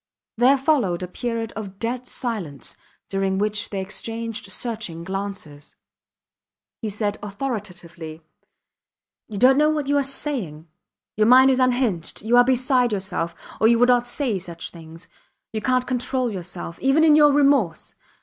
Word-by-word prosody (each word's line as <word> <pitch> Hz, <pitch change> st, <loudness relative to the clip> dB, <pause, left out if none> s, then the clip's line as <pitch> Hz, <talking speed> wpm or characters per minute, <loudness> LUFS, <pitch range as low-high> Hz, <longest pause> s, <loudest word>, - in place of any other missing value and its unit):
There 250 Hz, +4 st, +5 dB
followed 255 Hz, -, +1 dB
a -, -, -4 dB
period 230 Hz, +3 st, -4 dB
of 200 Hz, -3 st, -7 dB
dead 245 Hz, +3 st, -3 dB
silence, 200 Hz, -, -5 dB, 0.3 s
during 195 Hz, -1 st, -1 dB
which 210 Hz, +2 st, -1 dB
they 200 Hz, -, -4 dB
exchanged 220 Hz, +2 st, -5 dB
searching 215 Hz, -7 st, -5 dB
glances. 190 Hz, -6 st, -6 dB, 1.1 s
He 220 Hz, -, -2 dB
said 205 Hz, 0 st, -2 dB
authoritatively 180 Hz, -8 st, -6 dB, 1.0 s
You 210 Hz, -, -7 dB
dont 260 Hz, +5 st, +5 dB
know 300 Hz, +1 st, +4 dB
what 305 Hz, -2 st, -1 dB
you 285 Hz, +1 st, +1 dB
are -, -, +1 dB
saying. 250 Hz, -, -2 dB, 0.5 s
Your 215 Hz, 0 st, +3 dB
mind 260 Hz, +2 st, +7 dB
is 260 Hz, -, +1 dB
unhinged. 245 Hz, -11 st, 0 dB
You 230 Hz, +2 st, +2 dB
are 245 Hz, -, +8 dB
beside 255 Hz, -1 st, +2 dB
yourself, 185 Hz, -4 st, -3 dB, 0.2 s
or 220 Hz, -, +5 dB
you 235 Hz, +1 st, +5 dB
would 245 Hz, +1 st, +4 dB
not 245 Hz, -1 st, +3 dB
say 245 Hz, -6 st, 0 dB
such 170 Hz, -2 st, -7 dB
things. 165 Hz, +1 st, -12 dB, 0.5 s
You 215 Hz, -, -2 dB
cant 255 Hz, +2 st, +1 dB
control 250 Hz, -1 st, -1 dB
yourself. 175 Hz, -3 st, -7 dB
Even 270 Hz, +4 st, +3 dB
in 310 Hz, -2 st, +6 dB
your 295 Hz, -1 st, +6 dB
remorse 275 Hz, -, +2 dB
225 Hz, 150 wpm, -23 LUFS, 190-255 Hz, 1.1 s, are